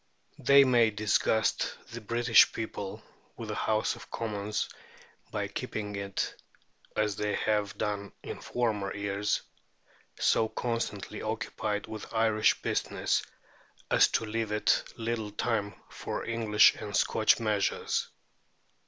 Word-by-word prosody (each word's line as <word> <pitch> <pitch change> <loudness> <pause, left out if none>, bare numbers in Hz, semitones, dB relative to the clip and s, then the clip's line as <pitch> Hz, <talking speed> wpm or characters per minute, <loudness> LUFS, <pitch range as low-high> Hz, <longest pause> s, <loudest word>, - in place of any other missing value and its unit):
They 140 0 +7
may 120 -4 +4
disgust 105 +1 +1
the 120 +1 -6
British 115 +3 +5
people 105 -3 -5 0.3
with - - -6
the - - -2
House 110 0 0
of - - -13
Commons 105 -2 -2 0.6
by - - -2
keeping 105 -1 -4
it 100 -1 -3 0.5
(as 105 -2 +1
they 105 -1 -1
have 105 -2 0
done 100 -1 -2
in - - -7
former 105 -5 -1
years) 100 0 -1 0.8
so 110 - +3
constantly 115 -4 -3
occupied 110 -2 -3
with 110 -1 -8
Irish 110 -1 +3
business - - 0 0.7
as - - +6
to 115 - -1
leave 110 0 -2
it 105 0 +2
little 115 -2 -2
time 105 -1 -1
for - - -5
English 115 -2 +5
and 105 -1 -6
Scotch 110 +2 +3
measures. 105 -3 0
110 Hz, 120 wpm, -29 LUFS, 105-115 Hz, 0.8 s, They